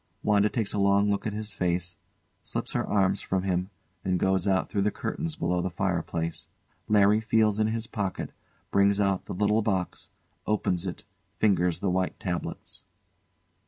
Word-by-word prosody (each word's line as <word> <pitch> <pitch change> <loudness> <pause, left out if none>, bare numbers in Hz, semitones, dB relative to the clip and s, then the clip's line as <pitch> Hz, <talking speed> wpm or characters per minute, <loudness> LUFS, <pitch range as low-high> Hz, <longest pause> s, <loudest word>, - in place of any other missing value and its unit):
[WANDA 105 0 +4
takes 110 -3 -1
a 105 - 0
long 100 +1 +4
look 100 +2 -1
at 105 - -3
his 105 0 -5
face, 90 0 -1 0.5
slips - - -3
her - - 0
arms 95 -2 +1
from 95 -1 -1
him, 90 -1 0 0.3
and 90 -1 +1
goes 95 0 +2
out 95 -1 +2
through 100 - -1
the 105 - +3
curtains 165 +8 -3
below 90 0 0
the 95 - -1
fireplace.] 85 -3 -2 0.4
[LARRY 105 0 +5
feels 110 -1 +2
in 110 - +3
his 110 +1 -2
pocket, 105 -4 -3 0.4
brings 100 +1 +4
out 100 -2 +1
the - - -5
little 105 +3 +2
box, 95 -5 -2 0.4
opens 95 -4 0
it, 90 - -6 0.3
fingers 90 -5 +2
the 95 - +1
white 90 0 -1
tabloids. 90 -3 -5
100 Hz, 165 wpm, -27 LUFS, 90-105 Hz, 0.5 s, LARRY